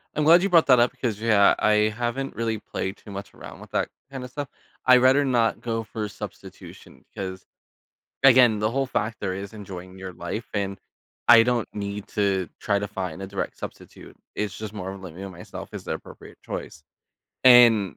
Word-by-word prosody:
I'm 150 - +1
glad 170 +4 +7
you 200 - +1
brought 170 -2 +5
that 125 -3 +6
up 120 +1 +4
‘cause, 110 -5 -1
yeah, 105 -3 +5
I 105 0 +3
haven't 120 +3 -3
really 115 -1 -1
played 95 -1 -5
too 105 - -13
much 100 0 -8
around - - -11
with - - -13
that - - 0 0.2
kind 135 -2 -6
of 125 - -8
stuff. 145 -1 -5 0.4
I'd 125 0 +8
rather 130 +3 +5
not 120 -4 +1
go 115 -1 -2
for 105 0 -5
substitution, - - -11
because, 95 -1 -6 0.8
again, 125 -5 +6
the 110 +1 0
whole 135 +2 0
factor 110 -6 -2
is 100 +2 -7
enjoying 95 -3 -9
your 95 -1 -7
life, 90 +7 -5
and 100 -1 -2 0.5
I 115 -1 +9
don't 120 -1 0
need 100 0 -5
to 100 -3 0
try 100 -2 +1
to 100 0 -4
find 95 -4 -5
a 95 - -5
direct 100 0 -5
substitute. - - -10 0.2
It's 105 -3 -3
just 110 -1 -6
more 95 -3 -5
of 95 - -9
living 90 +2 -8
on 95 - -8
myself 90 0 -9
is - - -7
the - - -3
appropriate - - -12
choice, 80 - -7 0.6
and 115 - +7
105 Hz, 195 wpm, -24 LUFS, 95-120 Hz, 0.8 s, I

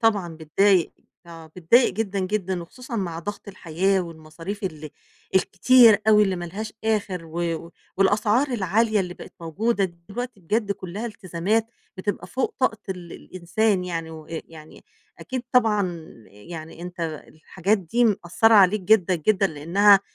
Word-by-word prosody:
طبعًا 200 -8 +1
بتضايق. 175 +4 +2 0.3
آه، 165 -1 -11
بتضايق 230 +9 +4
جدًا، 205 -2 -2
جدًا 190 -2 -2
وخصوصًا 245 +7 -8
مع 170 -5 -3
ضغط 205 +3 -7
الحياة 190 +1 0
والمصاريف 165 +4 -8
ال 155 -4 -5 0.4
الكتير 220 +3 +6
أوي 210 -1 +7
اللي 190 -3 +1
ما 175 - -5
لهاش 215 +6 -6
آخِر 200 -6 -1
و 165 0 -3
و - - -15 0.3
والأسعار 210 +7 +2
العالية 220 -1 +1
اللي 180 -2 -4
بقت - - -12
موجودة 195 +6 0
دلوقتي 200 +6 -7
بجد 205 +4 0
كُلّها 195 +4 -6
التزامات 210 +1 -1 0.3
بتبقى 205 +2 -3
فوق 260 - -2
طاقة 255 -5 +1
ال 180 -3 -6
الإنسان 185 +2 -1
يعني 165 -2 -4
وأ 155 -1 -11
يعني 160 -1 -10 0.3
أكيد 260 -2 -5
طبعًا 205 -9 +1 0.2
يعني 160 - -10
أنت 180 0 -8 0.3
الحاجات 190 +6 -1
دي 215 +7 0
مأثّرة 215 +2 +3
عليك 200 +1 +6
جدًا، 185 -1 +3
جدًا 195 +4 +2
لإنّها 190 +6 +4
190 Hz, 145 wpm, -24 LUFS, 170-215 Hz, 0.4 s, أوي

